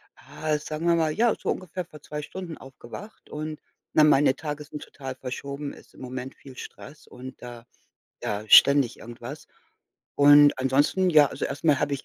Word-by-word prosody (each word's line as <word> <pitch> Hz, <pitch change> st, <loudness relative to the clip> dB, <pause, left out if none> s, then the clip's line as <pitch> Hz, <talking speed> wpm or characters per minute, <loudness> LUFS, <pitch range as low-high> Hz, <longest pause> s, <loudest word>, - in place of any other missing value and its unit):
ah, 155 Hz, -1 st, -3 dB
sagen 155 Hz, +3 st, -5 dB
wir 170 Hz, -, +4 dB
mal, 160 Hz, -2 st, +1 dB
ja, 235 Hz, +3 st, +2 dB
so -, -, -4 dB
ungefähr 180 Hz, -1 st, -4 dB
vor 150 Hz, -4 st, -15 dB
2 150 Hz, 0 st, -6 dB
Stunden 170 Hz, +1 st, -8 dB
aufgewacht 135 Hz, -, -12 dB
und 155 Hz, 0 st, -6 dB, 0.3 s
na, 155 Hz, -, +5 dB
meine 145 Hz, -2 st, +4 dB
Tage 150 Hz, -1 st, -5 dB
sind 150 Hz, 0 st, -9 dB
total 135 Hz, -2 st, -8 dB
verschoben, 140 Hz, +2 st, -6 dB
ist -, -, -17 dB
im -, -, -16 dB
Moment 130 Hz, +1 st, -7 dB
viel 130 Hz, -2 st, -15 dB
Stress 150 Hz, +5 st, -11 dB
und 130 Hz, +1 st, -11 dB
da 120 Hz, -1 st, -10 dB, 0.6 s
ja, 105 Hz, 0 st, -3 dB
ständig 140 Hz, 0 st, +6 dB
irgendwas. 120 Hz, +5 st, -10 dB, 0.7 s
Und 145 Hz, -1 st, +6 dB
ansonsten, 145 Hz, +8 st, +2 dB
ja, 150 Hz, -3 st, +6 dB
also -, -, -5 dB
erst 140 Hz, -, -5 dB
mal 150 Hz, -4 st, +4 dB
habe 145 Hz, -, -1 dB
ich 135 Hz, -, -7 dB
145 Hz, 180 wpm, -25 LUFS, 130-155 Hz, 0.7 s, ständig